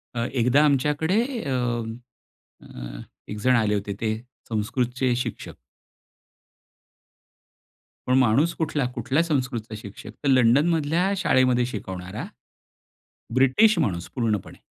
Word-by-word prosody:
अ, 115 0 -1
एकदा 125 +3 +3
आमच्याकडे 150 - +2 0.2
अ, 140 - -3 1.1
अ, - - -9 0.3
एक 105 - -5
जण 125 +4 +3
आले 110 -3 +2
होते 100 0 -3
ते 110 -1 0 0.3
संस्कृतचे 125 +3 0
शिक्षक. 125 - -5 2.5
पण 130 +1 +3
माणूस 130 +7 +3
कुठला? 150 -4 -1
कुठला 130 +6 +1
संस्कृतचा 130 -8 -2
शिक्षक? 105 0 -10
तर 140 - +1
लंडनमधल्या 150 +8 +3
शाळेमध्ये 130 -8 +3
शिकवणारा 100 - -6 1.1
ब्रिटिश 155 - +4
माणूस 90 - -1
पूर्णपणे. 110 -6 -2
125 Hz, 100 wpm, -24 LUFS, 110-145 Hz, 2.5 s, ब्रिटिश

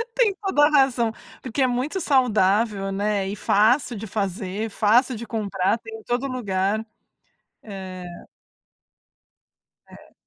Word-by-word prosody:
Tem 445 -6 +3
toda 295 -7 +3
razão, 265 -6 +3 0.3
porque 260 +2 -3
é 260 - +4
muito 260 +9 -2
saudável, 210 -6 +2
né, 200 0 -1
e 200 - -4
fácil 235 +6 +2
de 220 +2 -7
fazer, 200 +1 -3
fácil 235 +5 +3
de 230 +1 -7
comprar, 205 -2 -1
tem 225 -1 -9
em - - -17
todo 245 +3 -1
lugar. 210 -3 -1 0.8
É 190 -3 -8 1.9
É. - - -16
220 Hz, 125 wpm, -23 LUFS, 200-255 Hz, 1.9 s, é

